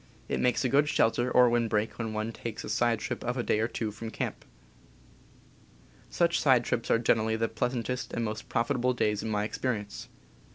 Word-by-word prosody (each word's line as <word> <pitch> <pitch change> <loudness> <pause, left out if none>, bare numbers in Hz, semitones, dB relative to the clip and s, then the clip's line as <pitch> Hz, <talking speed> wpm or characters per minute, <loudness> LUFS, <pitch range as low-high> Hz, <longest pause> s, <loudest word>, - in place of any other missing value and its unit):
It - - -1
makes 125 +1 +1
a - - +4
good 145 +3 +3
shel 115 -6 +3
ter 120 +2 -1
or 125 0 +6
windbreak 115 -2 0
when 110 -1 -2
one 110 +1 -2
takes 115 -1 -6
a - - -6
side 115 +1 +2
trip - - -4
of 125 +2 -2
a 120 - 0
day 105 - +1
or 110 - +1
two 110 -2 -3
from 115 +2 -7
camp. - - -4 1.6
Such 170 -2 +2
side 130 -4 +4
trips 120 0 -2
are - - +5
generally 110 -1 +2
the 115 +1 0
pleasantest 125 +2 -2
and 115 - -2
most 110 0 -5
profitable 125 +1 +1
days 105 -3 0
in 110 - -4
my 105 -1 0
experience. 105 -2 -3
115 Hz, 200 wpm, -29 LUFS, 110-125 Hz, 1.6 s, or